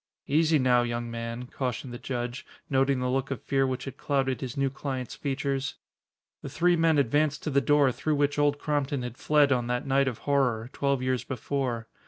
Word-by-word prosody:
"Easy 155 +2 +3
now, 125 -2 +4
young 120 0 -3
man," 115 +1 -5
cautioned 125 0 -4
the 120 - -7
judge, 120 0 -4 0.3
noting 135 0 +2
the 125 - -1
look 135 +1 0
of 135 -5 -3
fear 135 -1 +1
which 130 -1 -3
had 135 -1 -7
clouded 135 -2 0
his 130 -1 -5
new 135 -1 +1
client's 135 -2 -4
features. 140 -1 -2 0.7
The - - -6
three 175 +5 +3
men 165 -2 +3
advanced 145 +2 +1
to 155 - -2
the 140 0 +3
door 145 -1 +4
through 155 +5 -1
which 145 0 +1
Old 145 0 +3
Crompton 145 -3 -1
had 125 -1 -5
fled 145 +1 +3
on 120 -2 +1
that 125 0 -1
night 135 0 +2
of 125 -4 -2
horror, 125 -4 +1
twelve 140 -2 0
years 130 -1 0
before. 125 -3 -3
135 Hz, 200 wpm, -27 LUFS, 125-145 Hz, 0.7 s, now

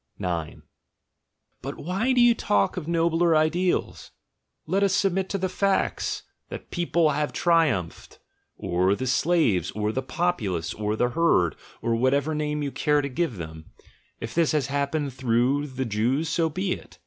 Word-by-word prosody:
"But 85 -4 -8
why 195 - -1
do 250 -1 +4
you 240 0 +6
talk 100 - +1
of 170 -4 -5
nobler 170 0 +2
ideals? 170 +4 0 0.6
Let 190 +5 0
us 195 -2 +3
submit 190 -1 +1
to 195 - -1
the 190 0 -1
facts; 195 +1 -1 0.3
that - - -6
the - - -32
people 170 -2 +2
have 150 +1 -1
triumphed 155 - 0 0.2
— - - -49
or 90 +3 +1
the 130 - -4
slaves, 130 - +2
or 105 +1 -2
the 130 - -2
populace, 130 - -2
or 105 0 -2
the 120 +2 +1
herd, 125 - +2 0.3
or 115 0 +1
whatever 140 +5 +1
name 150 0 -2
you 140 - -2
care 150 +1 +1
to 140 - -2
give 130 - -2
them 80 -1 -8 0.3
— - - -38
if 115 - -6
this 165 -2 +2
has 150 -4 +1
happened 140 0 -1
through 130 +3 +1
the 130 -1 -4
Jews, 120 +8 0
so 165 0 +1
be 185 +4 -2
it! - - -6
145 Hz, 170 wpm, -25 LUFS, 115-170 Hz, 0.6 s, you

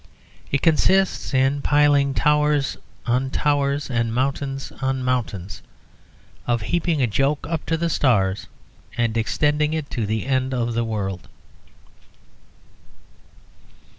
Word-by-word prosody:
It 140 - 0
consists 190 +4 +2
in 135 +1 +2
piling 145 -2 +3
towers 150 -2 +2 0.3
on 125 +2 +1
towers 145 0 0
and 115 -3 -1
mountains 135 +2 -2
on 130 -1 -1
mountains; 110 -7 -2 0.9
of 120 -2 0
heaping 170 +1 0
a - - +5
joke 135 +6 0
up 165 -1 -2
to 165 - +1
the 170 +1 0
stars 105 - +1 0.5
and 115 -2 0
extending 150 +6 +1
it 155 -3 -4
to 115 -4 -2
the 110 +2 -2
end 130 -1 0
of 120 -1 -1
the 115 +1 0
world. 100 -5 -4
135 Hz, 120 wpm, -22 LUFS, 120-150 Hz, 0.9 s, a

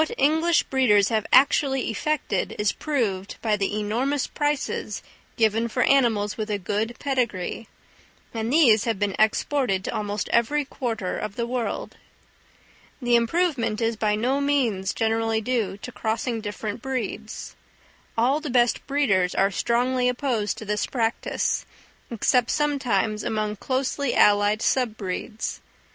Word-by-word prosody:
What 315 - -5
English 320 +4 +3
breeders 210 -7 +3
have 220 -2 0
actually 270 -2 +4
effected 300 +7 -1
is 210 -1 +2
proved 215 -10 -2
by 215 -2 +2
the 205 +1 -1
enormous 250 +7 0
prices 295 -2 -2 0.3
given 225 0 +2
for 250 +2 0
animals 225 -7 +2
with 215 -1 -3
a 210 - 0
good 210 +5 -2
pedigree; 235 -7 -2 0.7
and 225 0 -2
these 245 -9 +5
have 230 -3 0
been 200 -1 -1
exported 220 -2 +1
to - - -4
almost 205 0 -2
every 285 +5 +2
quarter 230 -8 -3
of 215 -2 -5
the 235 - -1
world. 240 -1 -3 1.0
The 245 -3 +2
improvement 235 -3 +1
is 230 0 0
by 210 -1 +1
no 255 +6 0
means 240 -10 +1
generally 225 0 0
due 220 -4 -1
to 250 - -8
crossing 225 +1 -2
different 210 +1 -5
breeds; 225 -4 -5 0.6
all 255 +6 +3
the 310 -2 -6
best 245 -1 +2
breeders 200 -11 +1
are 195 +1 +3
strongly 250 +5 +1
opposed 245 -4 -1
to 220 - -8
this 210 0 -1
practice, 230 -3 -1 0.5
except 240 +1 +2
sometimes 240 -8 0
among 215 -1 -2
closely 265 +3 -1
allied 205 +1 +4
sub 245 -5 +1
breeds. 205 +3 -4
230 Hz, 140 wpm, -24 LUFS, 210-265 Hz, 1.0 s, these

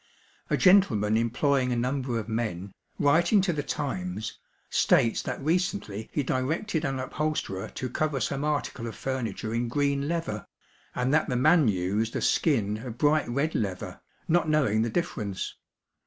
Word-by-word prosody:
A - - +2
gentleman 125 - +4
employing 125 +3 +1
a - - +1
number 125 0 -1
of 110 -2 -4
men, 105 -5 -3 0.2
writing 170 +8 +4
to 185 -2 0
the 150 - -1
Times, 105 -9 -4 0.3
states 115 - +3
that 125 - -4
recently 160 - -1
he 145 - 0
directed 155 +8 -1
an 135 -1 -1
upholsterer 130 -8 -2
to 130 - -3
cover 145 +3 -1
some 140 +2 -1
article 145 -5 -2
of 115 - -6
furniture 120 -4 -3
in 120 +1 0
green 140 +2 0
leather, 165 - -3 0.5
and 125 +2 0
that 155 0 +2
the 125 - 0
man 155 +3 +5
used 105 +3 0
a - - -1
skin 110 -10 +2
of 120 0 -7
bright 150 +1 +2
red 140 +6 0
leather, 95 -4 -3 0.3
not 165 -1 +2
knowing 135 -9 +2
the 115 - 0
difference. 110 - -3
130 Hz, 155 wpm, -27 LUFS, 110-150 Hz, 0.5 s, man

